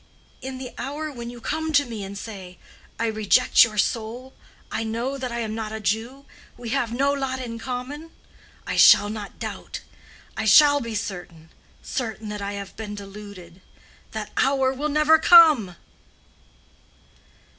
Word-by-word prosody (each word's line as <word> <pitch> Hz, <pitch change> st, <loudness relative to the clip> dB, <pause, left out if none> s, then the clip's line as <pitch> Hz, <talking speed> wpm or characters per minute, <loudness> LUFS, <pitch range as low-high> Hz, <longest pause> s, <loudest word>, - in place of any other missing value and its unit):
In 260 Hz, 0 st, -6 dB
the 255 Hz, -1 st, -8 dB
hour 300 Hz, +4 st, -4 dB
when 235 Hz, -3 st, -7 dB
you 240 Hz, 0 st, -10 dB
come 315 Hz, +6 st, -3 dB
to 285 Hz, -1 st, +4 dB
me 225 Hz, -4 st, -6 dB
and 195 Hz, +1 st, -7 dB
say, 190 Hz, -4 st, -9 dB, 0.4 s
'I 230 Hz, -, 0 dB
reject 220 Hz, +3 st, +4 dB
your 215 Hz, -2 st, -2 dB
soul: 230 Hz, +5 st, -2 dB, 0.4 s
I -, -, -2 dB
know 230 Hz, +5 st, -3 dB
that 255 Hz, -2 st, -4 dB
I 235 Hz, 0 st, -3 dB
am 220 Hz, -1 st, -3 dB
not 220 Hz, -1 st, -4 dB
a 220 Hz, -, -5 dB
Jew: 230 Hz, +7 st, -3 dB, 0.3 s
we 240 Hz, -1 st, -7 dB
have 240 Hz, -2 st, -1 dB
no 275 Hz, +4 st, +1 dB
lot 270 Hz, -2 st, -3 dB
in 230 Hz, -3 st, -6 dB
common'—I 265 Hz, +6 st, -8 dB
shall 205 Hz, -, +7 dB
not 210 Hz, -2 st, -7 dB
doubt. -, -, -7 dB, 0.5 s
I 220 Hz, -, -3 dB
shall 285 Hz, +6 st, +6 dB
be 230 Hz, -2 st, -5 dB
certain—certain 205 Hz, +4 st, -7 dB
that 210 Hz, -1 st, -5 dB
I 200 Hz, 0 st, -4 dB
have 200 Hz, -1 st, -7 dB
been 210 Hz, -1 st, -6 dB
deluded. 195 Hz, -3 st, -11 dB, 0.5 s
That 215 Hz, -1 st, -6 dB
hour 265 Hz, 0 st, +2 dB
will 290 Hz, +3 st, -3 dB
never 305 Hz, +2 st, +4 dB
come!" 310 Hz, -, +6 dB
230 Hz, 155 wpm, -24 LUFS, 210-270 Hz, 0.5 s, shall